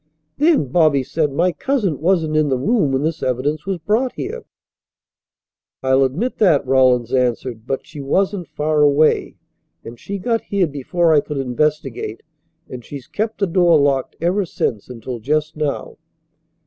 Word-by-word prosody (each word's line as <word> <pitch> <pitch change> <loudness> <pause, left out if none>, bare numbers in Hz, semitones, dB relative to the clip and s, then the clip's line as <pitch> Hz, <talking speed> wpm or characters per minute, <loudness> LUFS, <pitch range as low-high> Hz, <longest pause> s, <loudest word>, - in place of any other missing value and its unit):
"Then," 295 - +3
Bobby 155 -3 +3
said, 150 +2 -1
"my 175 +6 +1
cousin 235 - -1
wasn't 165 -3 +1
in 155 -1 +2
the 130 - +1
room 195 - +1
when 135 +1 0
this 160 +1 -2
evidence 145 +6 -2
was 195 -2 -1
brought 215 +10 0
here." 460 +5 -6 1.4
"I'll 130 +1 +3
admit 170 - -2
that," 160 -10 +4
Rawlins 130 -3 +3
answered, 125 -2 -1
"but 135 - -3
she 155 -3 -9
wasn't 185 +5 0
far 150 0 0
away, 145 +1 +3 0.5
and 115 +1 -9
she 200 - -5
got 230 +4 -1
here 200 -2 0
before 160 +3 0
I 150 - +6
could 150 0 -5
investigate, 135 -3 -2 0.4
and 125 -2 -8
she's 135 +1 -9
kept 220 +1 -3
the 200 - +2
door 175 -3 +4
locked 140 -2 +1
ever 180 +5 +1
since 115 - -3
until 125 0 -6
just 150 +6 -1
now." 150 -1 -3
150 Hz, 160 wpm, -19 LUFS, 130-180 Hz, 1.4 s, I